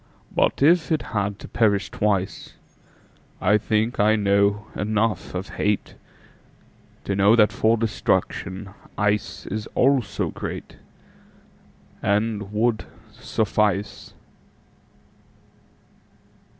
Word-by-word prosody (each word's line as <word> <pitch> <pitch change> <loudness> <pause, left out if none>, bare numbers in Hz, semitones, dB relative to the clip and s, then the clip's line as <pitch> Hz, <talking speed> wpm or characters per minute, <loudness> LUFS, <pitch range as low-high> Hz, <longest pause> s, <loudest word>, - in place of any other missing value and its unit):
But - - +2
if 165 -1 +4
it 155 - +1
had 100 -1 -1
to - - -10
perish 100 -4 +1
twice,I 105 +1 -3
think 110 +3 0
I 105 +1 +4
know 100 0 +2
enough 110 -1 -1
of 90 +2 -5
hateTo 105 -1 -1 1.1
know 100 +2 +4
that 105 -3 +5
for 115 +1 +2
destruction 100 -3 -1 0.3
iceIs 105 0 -2
also 130 -4 +1
greatAnd 105 0 -6
would 110 +2 0 0.3
suffice. 105 -2 -1
105 Hz, 80 wpm, -23 LUFS, 100-110 Hz, 1.1 s, that